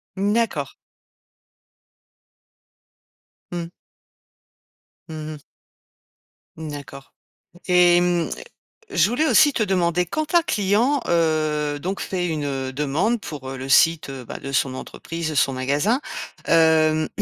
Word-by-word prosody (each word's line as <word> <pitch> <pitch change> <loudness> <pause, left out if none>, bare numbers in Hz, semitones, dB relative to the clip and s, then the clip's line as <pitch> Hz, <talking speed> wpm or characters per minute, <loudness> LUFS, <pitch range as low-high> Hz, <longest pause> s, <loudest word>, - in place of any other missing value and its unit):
Mmh, 200 +2 0
d'accord. 210 - 0 2.8
Mmh. 175 -1 -4 1.4
Mmh 155 -1 -6
mh. - - -10 1.2
Mmh, 160 -1 -7
d'accord 140 -2 -10 0.5
et 180 -1 +5
hem, 175 -1 +1 0.6
je 175 - +3
voulais 250 +8 +1
aussi 305 -1 +5
te 230 - 0
demander, 180 -3 +1
quand 310 - -3
un 340 - +6
client, 225 - +1
heu, 155 -3 +1
donc 190 +5 -3
fait 180 -2 -2
une 140 -4 -3
demande 150 - 0
pour, 150 -6 -8
heu, 135 - -6
le 130 +1 -7
site, 165 +4 +4 0.2
bah, - - -6
de 135 - -7
son 130 -1 +1
entreprise, 165 +4 -6
son 140 -1 +2
magasin, 145 - 0 0.5
hem, 160 -1 +3
165 Hz, 115 wpm, -22 LUFS, 145-190 Hz, 2.8 s, un